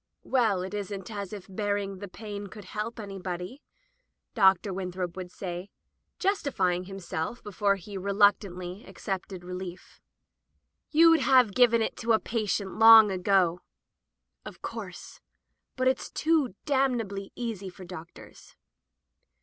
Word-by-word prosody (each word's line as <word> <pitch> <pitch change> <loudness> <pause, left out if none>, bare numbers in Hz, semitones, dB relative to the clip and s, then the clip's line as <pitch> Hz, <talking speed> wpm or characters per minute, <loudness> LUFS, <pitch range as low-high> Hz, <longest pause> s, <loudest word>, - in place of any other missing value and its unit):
"Well, 220 -8 +2
it 190 - -6
isn't 200 0 -5
as 200 -3 -5
if 205 -3 -8
my 195 - -14
bearing 200 -2 -1
the 200 - -6
pain 205 +1 -7
could 205 0 -11
help 215 +5 -5
anybody," 195 - -6 0.7
Dr. 195 -2 +4
Winthrop 180 -2 -4
would 185 -1 -6
say, 180 +1 -6 0.5
justifying 220 - 0
himself 190 +2 -5
before 200 0 +1
he 195 +1 -8
reluctantly 195 -1 +1
accepted 190 -2 -5
relief. 180 0 -8 0.9
"YouM 330 +1 +6
have 255 -6 +4
given 235 -1 +5
it - - -3
to 230 -1 +1
a 220 - +4
patient 210 -3 -2
long 225 -2 +9
ago.'' 180 -2 +2 0.8
"Of - - -11
course. - - -7 0.6
But 255 0 +1
it's 260 - 0
too 305 - +1
damnably 240 -9 0
easy 220 -6 -4
for 185 +1 -12
doctors." 175 -2 -12
200 Hz, 125 wpm, -28 LUFS, 185-225 Hz, 0.9 s, long